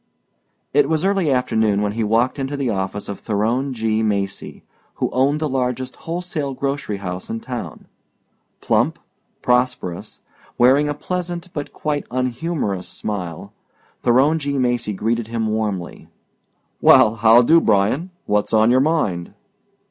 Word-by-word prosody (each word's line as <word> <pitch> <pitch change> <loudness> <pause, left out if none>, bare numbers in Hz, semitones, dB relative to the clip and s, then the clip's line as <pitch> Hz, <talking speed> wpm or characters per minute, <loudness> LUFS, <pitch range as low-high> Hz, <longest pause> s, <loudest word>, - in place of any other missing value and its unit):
It 145 0 +4
was 160 +2 +1
early 195 -5 +2
afternoon 110 -5 +1
when 105 - 0
he 115 +2 -2
walked 115 +6 +1
into 135 +1 -3
the 135 -4 -1
office 95 0 -3
of 100 - -6
Theron 115 +6 0
G. 110 -2 0
Macy, 100 -2 -2 0.3
who - - -2
owned 140 +4 +2
the 155 - 0
largest 130 -1 -2
wholesale 165 -5 -4
grocery 135 -6 -2
house 90 -1 -6
in 115 - -3
town. 125 0 -7 0.8
Plump, - - +1 0.5
prosperous, 125 -8 -1 0.4
wearing 135 +5 +4
a 145 - -2
pleasant 175 +2 -4
but 145 -1 -5
quite 150 -1 -3
unhumorous 125 - -2
smile, 90 -6 -5 0.5
Theron 135 +7 +3
G. 140 -1 -2
Macy 120 -4 0
greeted 115 +3 -1
him 115 -1 -2
warmly. 105 -5 -3 0.7
"Well 110 +1 +6
how 115 +3 +6
do, 165 +6 +5
Bryan? 110 - +2 0.2
What's 105 0 0
on 110 +1 +5
your 130 - +5
mind?" 130 - 0
125 Hz, 140 wpm, -20 LUFS, 105-145 Hz, 0.8 s, Well